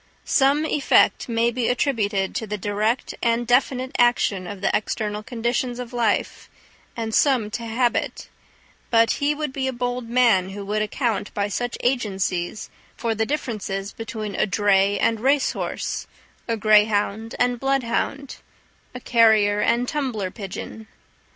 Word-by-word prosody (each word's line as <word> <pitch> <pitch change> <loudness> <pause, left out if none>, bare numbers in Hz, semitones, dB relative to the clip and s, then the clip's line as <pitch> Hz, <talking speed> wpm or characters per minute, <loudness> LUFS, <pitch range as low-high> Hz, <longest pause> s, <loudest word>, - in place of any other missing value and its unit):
Some 280 +3 +3
effect 295 -4 +2
may 230 0 +2
be 240 -1 -1
attributed 210 -7 0
to 220 - -3
the 210 +1 -3
direct 210 +5 -1
and 235 0 +1
definite 255 +1 +1
action 220 -6 +2
of 200 -1 -7
the - - +1
external 210 0 -2
conditions 240 +2 -2
of 250 -1 -7
life, 230 -4 -1 0.5
and 225 -1 -3
some 245 -7 +2
to 230 +2 -4
habit; 240 +2 -1 0.6
but 230 -1 +4
he 290 +1 +2
would 300 -2 -4
be 265 -1 -2
a - - 0
bold 245 -1 -3
man 230 -7 +3
who 200 +1 -7
would 210 +1 -1
account 215 -1 -1
by 205 0 0
such 245 +4 -3
agencies 195 -6 -1 0.3
for 230 -1 -1
the 220 0 -1
differences 205 -8 -3
between 220 -2 -6
a - - +1
dray 200 0 +2
and 225 +1 +1
race 270 +3 +2
horse, - - -4 0.4
a 230 -1 -1
greyhound 215 0 +2
and 245 -1 +1
bloodhound, 270 +1 -1 0.6
a - - -5
carrier 220 -4 +4
and 240 +2 +1
tumbler 245 -11 -2
pigeon. 215 +2 -8
230 Hz, 145 wpm, -23 LUFS, 210-250 Hz, 0.6 s, but